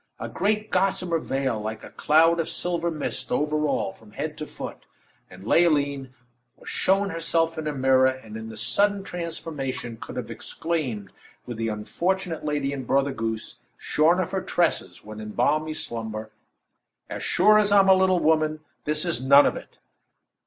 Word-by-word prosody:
A - - -5
great 215 +1 -1
gossamer 185 -3 +1
veil 135 -6 -2
like 110 +1 -5
a - - -10
cloud 165 +2 +4
of 165 - -1
silver 170 -1 -2
mist 155 -3 -4
over 150 +1 +1
all, 95 - -1
from 105 0 -18
head 150 +4 -4
to 155 - -5
foot; - - -8 0.4
and 95 +2 -13
Leoline 140 -3 +2 0.5
was - - -17
shown 195 +1 +1
herself 165 0 0
in 160 -1 -4
a - - 0
mirror, 130 -1 +4
and 130 -5 -4
in 110 0 -6
the 110 - -9
sudden 205 -1 +2
transformation, 155 - -5
could - - -9
have - - -5
exclaimed, 130 - -3 0.3
with 120 -2 -6
the 115 0 -1
unfortunate 170 - -2
lady 145 -2 -1
in 135 -3 -6
Mother 140 0 +2
Goose, 110 -2 -4 0.2
shorn 165 +4 +2
of 185 - -1
her 190 - -1
tresses 175 - -1
when 110 0 -8
in 105 -1 -7
balmy 155 +5 +1
slumber: 110 -5 -5 0.8
"As - - -6
sure 215 0 +5
as 205 -1 +2
I'm 200 -1 +6
a 190 - +8
little 185 -1 +3
woman, 155 -1 +2 0.2
this 150 +2 +1
is 170 -7 -1
none 140 +2 +7
of - - +1
it!" - - -10
150 Hz, 175 wpm, -25 LUFS, 130-170 Hz, 0.8 s, a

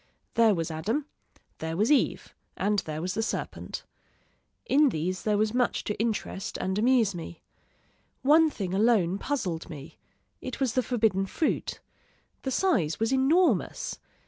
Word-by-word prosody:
There 225 -3 +4
was 165 -1 -2
Adam 220 - -1 0.5
there 160 +1 -3
was 215 +8 +2
Eve 295 - +1 0.2
and 205 +1 +1
there 155 -2 -5
was 185 +1 -2
the 225 - -1
serpent. 225 - -4 0.8
In 295 - +4
these 180 -1 -2
there 210 -1 +1
was 215 +1 +1
much 245 -1 +1
to 210 - -4
interest 220 -3 -2
and 190 +2 -1
amuse 230 -3 +3
me. 170 -1 -8 0.8
One 315 +4 +6
thing 195 -10 -4
alone 200 -3 +3
puzzled 185 - -3
me; 145 -2 -10 0.4
it - - -6
was 260 -5 +1
the 255 - +2
forbidden 220 -5 +1
fruit. 310 - -1 0.6
The 265 - -3
size 245 - +1
was 225 +3 +1
enormous. 305 +8 +2
215 Hz, 145 wpm, -28 LUFS, 185-260 Hz, 0.8 s, One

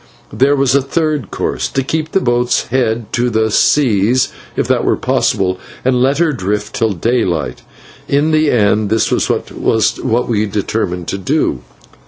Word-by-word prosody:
There 140 +2 +3
was 135 -2 +2
a 140 - +4
third 150 - -1
course: - - -2
to 135 - -2
keep 155 +3 -3
the - - +2
boat's 120 -5 0
head 115 -3 -1
to 120 +1 +1
the 110 -1 0
seas, 120 -2 +3 0.3
if - - -1
that - - +1
were - - +2
possible, 95 -1 0 0.3
and 125 -1 +2
let 135 +2 +2
her 165 -1 +2
drift 105 -2 -3
till 110 -2 +1
daylight. 90 - -1 0.5
In 145 +3 +1
the 155 -1 +3
end 105 -3 +2
this 110 0 +1
was - - +1
what 110 +2 0
we 110 -2 0
determined 95 -3 -2
to 100 - -3
do. 130 - 0
120 Hz, 165 wpm, -15 LUFS, 105-135 Hz, 0.5 s, a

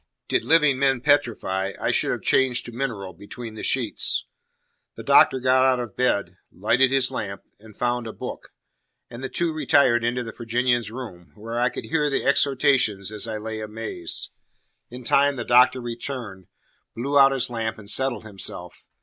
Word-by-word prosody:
Did - - +1
living 150 -5 +4
men 135 -3 +2
petrify, 100 -9 +1
I - - 0
should - - 0
have - - -3
changed 125 -2 +2
to 120 - -8
mineral 115 -7 -4
between 110 +6 -9
the 110 - -8
sheets. 120 -7 +1 0.7
The - - -9
Doctor 130 - +5
got 130 +1 +3
out 130 -1 +3
of 120 -5 -6
bed, 100 -8 0
lighted 125 +7 +2
his 135 -1 +2
lamp, 100 -6 -5 0.2
and 110 -1 -16
found 120 -1 -1
a - - -5
book; - - -8 0.6
and 120 +2 -9
the 130 - -3
two 170 +4 -1
retired 140 -6 +3
into 120 +1 -1
the 115 - -7
Virginian's 120 0 0
room, 110 -8 -9
where 115 +2 -5
I 125 +1 +2
could - - -7
hear 150 -2 0
the 140 - -1
exhortations 135 -8 +2
as 110 +1 -4
I 110 -1 -3
lay 110 +1 -5
amazed. 110 -5 -5 0.6
In 125 +1 -10
time 140 +3 +3
the 120 -3 -5
Doctor 125 +1 +5
returned, 120 -5 -6 0.5
blew 140 +5 +1
out 135 0 +7
his 130 -2 -1
lamp, 115 -2 -3
and 105 -2 -13
settled 130 +6 0
himself. 95 -4 -5
120 Hz, 175 wpm, -24 LUFS, 110-130 Hz, 0.7 s, out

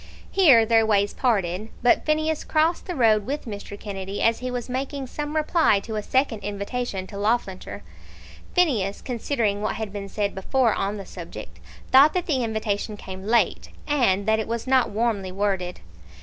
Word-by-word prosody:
Here 280 -13 +6
their 225 0 +4
ways 205 -2 +2
parted, 210 -4 0
but 245 - +3
Phineas 310 0 +1
crossed 320 +2 +1
the 360 - -3
road 220 -4 +3
with 290 +3 -3
Mr. 205 -2 -7
Kennedy, 195 -1 -5
as 230 0 +2
he 255 - -4
was 245 -2 -4
making 270 +2 -3
some 295 +4 -5
reply 310 - +3
to 220 +2 -6
a 210 - -1
second 260 -1 0
invitation 200 0 -4
to 200 - -9
Loughlinter. 205 -3 -2 0.7
Phineas, 235 - +2
considering 230 -4 -1
what 215 - -1
had 215 -3 -5
been 200 -1 -6
said 205 0 -1
before 230 +4 +1
on 200 +2 -2
the 195 - -7
subject, 110 - -9 0.3
thought 280 +5 +7
that 360 - 0
the 265 -6 0
invitation 215 -1 -2
came 190 0 -8
late, 235 +1 +1 0.2
and 235 -10 +2
that 220 0 +2
it 220 - -3
was 230 0 -3
not 260 -2 +3
warmly 205 -3 -1
worded. 190 -2 -2
220 Hz, 175 wpm, -24 LUFS, 200-260 Hz, 0.7 s, thought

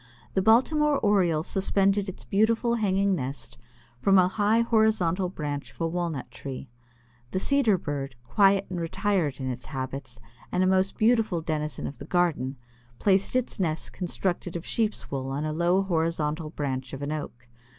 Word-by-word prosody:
The 190 - +2
Baltimore 285 +8 +4
Oriole 180 -8 +2
suspended 195 +2 +1
its 190 - -9
beautiful 225 +3 +2
hanging 200 -3 +2
nest 135 -6 -5 0.4
from 195 +9 +4
a 180 -1 +6
high 210 +4 +2
horizontal 215 -6 +2
branch 145 -5 -4
of - - -25
a 165 - +1
Walnut 165 -5 -3
tree. 135 -2 -7 0.6
The - - -3
Cedar 240 -4 +3
Bird, 140 -5 -4
quiet 195 - +3
and 175 -2 -2
retired 165 -4 0
in 130 -1 -2
its 125 0 -7
habits, 135 +1 -5 0.3
and 180 - +2
a - - +3
most 190 +1 +2
beautiful 220 -6 +2
denizen 150 -4 -3
of 135 - -6
the 140 - -8
garden, 155 -7 0 0.4
placed 195 - +2
its 255 -3 -1
nest 160 -4 -1
constructed 180 -1 -3
of 170 - -4
sheep's 220 -2 -2
wool 135 -1 -3
on 140 +3 -2
a 155 - -2
low 175 +4 +2
horizontal 160 -3 -1
branch 135 -4 -4
of 135 +1 -5
an 145 - -2
Oak. 125 -5 -6
175 Hz, 165 wpm, -27 LUFS, 145-200 Hz, 0.6 s, a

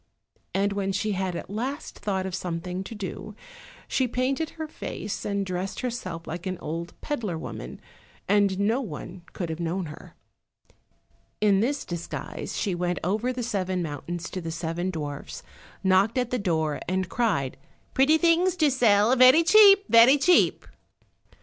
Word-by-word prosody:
And 200 +1 +1
when 195 -1 -1
she 205 +2 -1
had 190 -2 -2
at - - -6
last 255 +9 -5
thought 190 -2 -2
of 190 - -5
something 180 +1 -4
to 225 - -8
do, 205 +1 -6 0.5
she 260 - +1
painted 260 +6 -1
her 315 -1 -4
face, 210 -8 -6
and 200 -1 -1
dressed 185 +1 -4
herself 185 -10 -4
like 175 +3 -6
an 185 -1 -3
old 170 +2 -6
peddler 220 - -3
woman, - - -7 0.5
and 200 -1 +3
no 220 +6 +1
one 180 - -7
could 175 -3 -4
have 160 - -5
known 175 +2 -2
her. 150 -1 -11 1.2
In 205 -2 +4
this 275 +7 -1
disguise 170 -1 -5
she 200 - -1
went 175 0 -1
over 215 +8 0
the 250 -1 -4
seven 185 -5 -1
mountains 165 +3 -5
to 185 - -4
the 165 - -5
seven 165 +2 -3
dwarfs, 150 -5 -6 0.4
and 190 - +1
knocked 200 +6 +3
at 250 -1 0
the 250 - 0
door 160 -6 0
and 185 0 0
cried, 180 - 0 0.4
"Pretty 280 +4 +4
things 345 +2 +3
to 310 -5 +3
sell, 230 -2 +4
very 255 +6 +7
cheap, 400 +2 +7
very 235 +5 +7
cheap." 355 +5 +3
200 Hz, 160 wpm, -26 LUFS, 175-250 Hz, 1.2 s, very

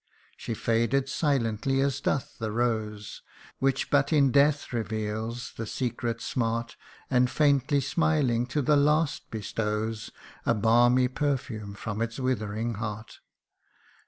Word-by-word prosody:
She 115 - -5
faded 115 +5 +1
silently 135 -3 0
as 140 0 0
doth 135 - -2
the 110 -2 -2
rose, 110 -3 -2 0.4
Which 135 0 0
but 140 +1 +3
in 140 -4 +4
death 145 0 +3
reveals 110 +1 -3
the 115 - -4
secret 120 -1 -3
smart, 115 -1 -2 0.4
And 125 -1 +4
faintly 140 -1 +2
smiling, 135 -4 +1
to 145 +3 -1
the 150 +4 +4
last 150 +2 +1
bestows 110 0 -3 0.3
A 120 - +2
balmy 120 +4 +4
perfume 125 -7 -3
from 105 +1 -4
its 115 +1 -2
withering 115 -3 -1
heart. 110 0 -6
120 Hz, 125 wpm, -27 LUFS, 110-135 Hz, 0.4 s, in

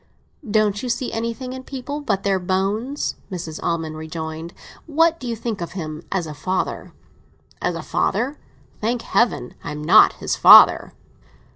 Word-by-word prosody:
"Don't 210 -1 +1
you 250 - -4
see 240 +1 -2
anything 230 +3 -4
in 260 0 -8
people 280 +3 -6
but 200 -8 -1
their 195 -1 +1
bones?" 200 +9 -2
Mrs. 165 -4 -6
Almond 160 -2 -2
rejoined. 160 +1 -6 0.4
"What 330 +2 +2
do 255 - -7
you 235 - -2
think 225 -3 -4
of 170 - -5
him 155 -4 -6
as 185 -3 -1
a 155 - -7
father?" 185 +6 -3 0.7
"As - - -1
a - - -6
father? 275 +4 -1 0.4
Thank 230 +2 -1
Heaven 235 - 0
I - - -5
am 150 0 -6
not 160 - +6
his - - -3
father!" - - +7
200 Hz, 160 wpm, -21 LUFS, 165-245 Hz, 0.7 s, father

